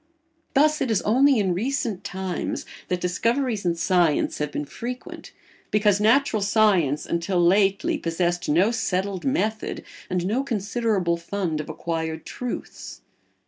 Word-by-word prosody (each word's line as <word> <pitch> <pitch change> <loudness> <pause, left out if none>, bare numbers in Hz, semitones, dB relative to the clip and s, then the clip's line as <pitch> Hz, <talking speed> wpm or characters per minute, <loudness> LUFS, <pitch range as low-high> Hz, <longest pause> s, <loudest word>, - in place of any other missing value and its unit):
Thus 305 +2 +4
it 260 - 0
is 220 -4 +1
only 265 +5 +4
in 190 -4 +1
recent 225 -1 -2
times 190 -2 -4 0.2
that 180 - -1
discoveries 230 +4 0
in 170 - +1
science 170 -3 +1
have 150 0 -2
been 145 - -3
frequent, 245 - -7 0.4
because 210 -1 +3
natural 225 0 +3
science 195 -8 +2
until 170 +2 -1
lately 195 - +3
possessed 175 -1 -1
no 180 +9 +4
settled 195 -4 -2
method 220 -5 -1 0.3
and 180 -1 -1
no 230 +8 0
considerable 210 -6 0
fund 170 -2 -3
of 150 - -10
acquired 160 -1 -3
truths. 250 -1 -6
200 Hz, 135 wpm, -24 LUFS, 175-230 Hz, 0.4 s, Thus